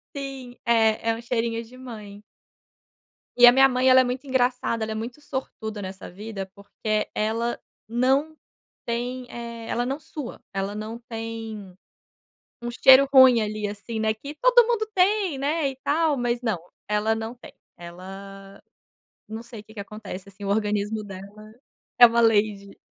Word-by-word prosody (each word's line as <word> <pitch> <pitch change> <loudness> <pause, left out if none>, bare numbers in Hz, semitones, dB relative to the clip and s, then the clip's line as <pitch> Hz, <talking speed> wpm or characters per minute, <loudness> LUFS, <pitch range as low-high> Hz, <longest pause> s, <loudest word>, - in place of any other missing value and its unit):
Sim, 270 -3 -6
é, 225 -1 +3
é - - -1
um 230 - -8
cheirinho 230 -1 -1
de 240 +3 -15
mãe. 215 -5 -10 1.2
E 245 - +9
a - - +10
minha 270 +2 +6
mãe 255 0 +2
ela 260 0 +8
é - - +2
muito 255 +2 -3
engraçada, 250 -3 0
ela 220 - -3
é - - -3
muito 235 +6 -6
sortuda 220 -6 -5
nessa 190 0 -7
vida 200 +1 -6
porque 210 +1 -3
ela 230 +2 -1 0.3
não 265 +7 +1 0.5
tem, 245 +2 -3
eh, 235 -1 -7
ela 240 - -1
não 270 +3 -3
sua, 295 -4 -8
ela 195 +1 -2
não 215 +2 -6
tem, 225 -4 -6 0.9
um 240 0 -4
cheiro 265 +3 +7
ruim 260 -3 +8
ali, 210 0 -2
assim, 210 +2 -6
não 220 0 +1
é - - +2
que 280 +7 -9
todo - - +6
mundo 450 -2 0
tem, 380 -4 +2
né, 290 +2 0
e 270 - -8
tal, 305 0 +2
mas 240 -1 -1
não, 220 -6 0 0.3
ela 210 +1 +1
não 225 +2 -5
tem, 245 - -14 0.2
ela, 195 +3 -10 0.7
não 220 +1 -6
sei 230 -2 -10
o - - -21
que 220 - -17
que 215 - -9
acontece 200 -2 -8
assim 200 +1 -13
o - - -2
organismo 210 +1 0
dela 200 +1 -10 0.6
é 240 - +11
uma 235 0 +2
lady. 205 -3 +1
230 Hz, 170 wpm, -25 LUFS, 210-255 Hz, 1.2 s, é